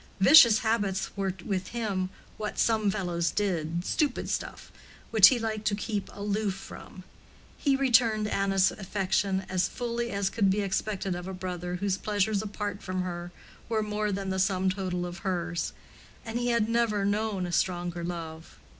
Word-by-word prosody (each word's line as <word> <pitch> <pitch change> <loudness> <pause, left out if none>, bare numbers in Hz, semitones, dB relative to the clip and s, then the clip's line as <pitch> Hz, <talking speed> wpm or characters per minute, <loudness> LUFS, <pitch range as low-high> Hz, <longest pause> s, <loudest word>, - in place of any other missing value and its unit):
Vicious 235 0 +8
habits 205 -4 0
were 195 -1 -1
with 185 -2 -2
him 205 -6 -2 0.3
"what 210 -1 -4
some 220 -3 +2
fellows 175 -4 -1
did"—"stupid 180 - -1
stuff" - - -4 0.4
which 215 -3 +9
he 260 - +3
liked 220 -2 -3
to 205 - +2
keep 210 -1 -3
aloof 205 -1 -2
from. 190 -1 -11 0.5
He 280 -2 +1
returned 230 -5 +3
Anna's 195 -2 +2
affection 195 -1 -1
as 185 -1 +1
fully 235 -1 -3
as 200 -2 -1
could 200 -3 +2
be 200 +2 +1
expected 195 -1 -2
of 175 +1 -6
a 190 - -5
brother 180 -1 -4
whose 195 +1 -1
pleasures 205 -1 0
apart 205 -1 -4
from 185 0 -2
her 175 -1 -5 0.4
were 220 -2 +1
more 210 0 -1
than 195 -1 -3
the 190 - -1
sum 190 -1 +2
total 185 -2 -3
of 175 +1 -7
hers; 175 -3 -2 0.5
and 225 +1 -3
he 245 - -1
had 235 -3 +2
never 230 -3 +1
known 205 -2 0
a 175 - -5
stronger 175 -1 -1
love. 165 -2 -6
195 Hz, 165 wpm, -28 LUFS, 185-215 Hz, 0.5 s, which